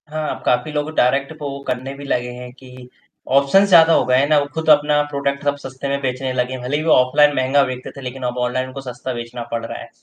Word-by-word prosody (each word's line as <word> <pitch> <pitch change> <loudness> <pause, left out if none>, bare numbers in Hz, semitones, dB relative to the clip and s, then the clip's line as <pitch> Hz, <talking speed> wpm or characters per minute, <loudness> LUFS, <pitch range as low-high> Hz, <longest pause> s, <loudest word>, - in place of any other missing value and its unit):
हाँ, 155 0 -3
अब - - -13
काफ़ी 125 +5 +1
लोग 150 0 -2
डायरेक्ट 135 +4 +2
पो 145 - -4 0.2
करने 130 +2 -3
भी 140 - -10
लगे 125 -2 -1
हैं 125 0 -9
कि 125 -1 -14 0.5
ऑप्शंस 195 +9 +3
ज़्यादा 165 -2 +7
हो - - +3
गए 125 0 +2
हैं 140 +2 +3
ना, 155 -1 +5
वो 145 - -1
खुद 160 0 -2
अपना 150 0 +4
प्रॉडक्ट 140 0 -2
अब 145 - +2
सस्ते 135 +1 -6
में 140 0 -1
बेचने 130 0 -2
लगे 125 0 -1
हैं, 130 - -6
भले 135 +4 -1
ही 155 - -3
वो 160 - +1
ऑफलाइन 145 +3 +4
महँगा 130 +2 +3
बेचते 130 0 -6
थे, - - -8
लेकिन 130 0 -7
अब 125 - -11
ऑनलाइन 130 +1 -2
उनको 135 +1 -8
सस्ता 125 +2 -6
बेचना 120 0 -6
पड़ 115 -1 -3
रहा - - -6
है। - - -11
135 Hz, 255 wpm, -19 LUFS, 125-145 Hz, 0.5 s, ज़्यादा